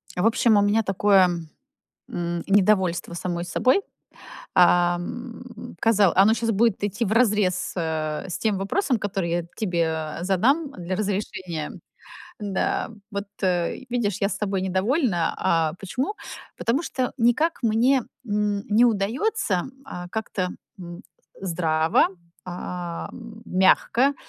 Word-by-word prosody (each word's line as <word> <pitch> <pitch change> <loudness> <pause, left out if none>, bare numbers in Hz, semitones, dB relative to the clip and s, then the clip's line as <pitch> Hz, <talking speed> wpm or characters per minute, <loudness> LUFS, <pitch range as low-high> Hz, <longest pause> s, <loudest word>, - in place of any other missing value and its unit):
В 180 - 0
общем, 225 -1 +4
у 205 - +5
меня 205 +2 +3
такое, 195 -1 +4 0.8
м, 170 -1 -3
недовольство 190 -4 +2
самой 175 0 -3
собой. 255 - +2 0.7
Ам, 180 +9 +1
казал 210 -5 +4
оно 200 +4 +6
сейчас 230 0 0
будет 220 -1 +2
идти 205 +3 -1
вразрез, 210 -4 +2
э, 160 -3 -2
с 175 - -3
тем 215 -3 0
вопросом, 250 - 0
который 195 -4 -2
я 170 0 -1
тебе, 180 -6 -1 0.4
э, - - -5
задам 265 - +2
для 180 -5 -4
разрешения. 185 -5 -3 0.7
Да, 205 0 -1 0.2
вот, 200 0 -4 0.2
э, 180 -3 +1
видишь, 210 -5 -1
я 195 - +2
с 200 - -3
тобой 195 -2 -1
недовольна. 190 - +1
А, 165 -2 +2
почему? 255 - -3 0.4
Потому 255 +7 0
что 255 -6 -2
никак 250 +9 +2
мне, 240 +4 +3 0.2
м, 205 -1 0
не 215 +3 +5
удается, 215 - 0 0.2
э, 180 0 -7
как-то, 200 -4 -2 0.3
м, 175 +1 -9 0.4
здраво, 165 -3 +2 0.4
ам, 180 +5 -6
мягко 225 +8 +3
200 Hz, 125 wpm, -24 LUFS, 180-225 Hz, 0.8 s, оно